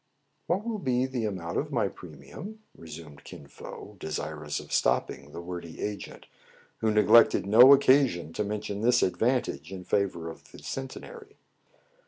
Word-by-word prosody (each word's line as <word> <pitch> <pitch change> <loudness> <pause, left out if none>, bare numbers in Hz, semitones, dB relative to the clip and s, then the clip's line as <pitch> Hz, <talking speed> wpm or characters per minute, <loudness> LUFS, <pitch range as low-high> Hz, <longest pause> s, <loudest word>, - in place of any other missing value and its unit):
*' - - -46
"What 190 +5 0
will 225 -2 -3
be 130 -5 +1
the 130 -4 -3
amount 90 -5 -3
of - - -4
my - - +1
premium?" 215 +5 -10
resumed 80 -3 -11
Kin 70 - -11
Fo, - - -11
desirous 75 -1 -4
of - - -9
stopping 70 +2 0
the 85 - -7
wordy 85 -1 -8
agent, 105 -1 -6 0.5
who 110 - +1
neglected 105 0 +5
no 120 +7 +8
occasion 130 - +4
to 105 - -1
mention 105 0 -4
this 120 +1 +4
advantage 90 - 0
in 95 -1 -7
favor 90 -3 -1
of 80 - -11
the - - -12
Centenary. 415 - -8
105 Hz, 155 wpm, -28 LUFS, 85-130 Hz, 0.5 s, no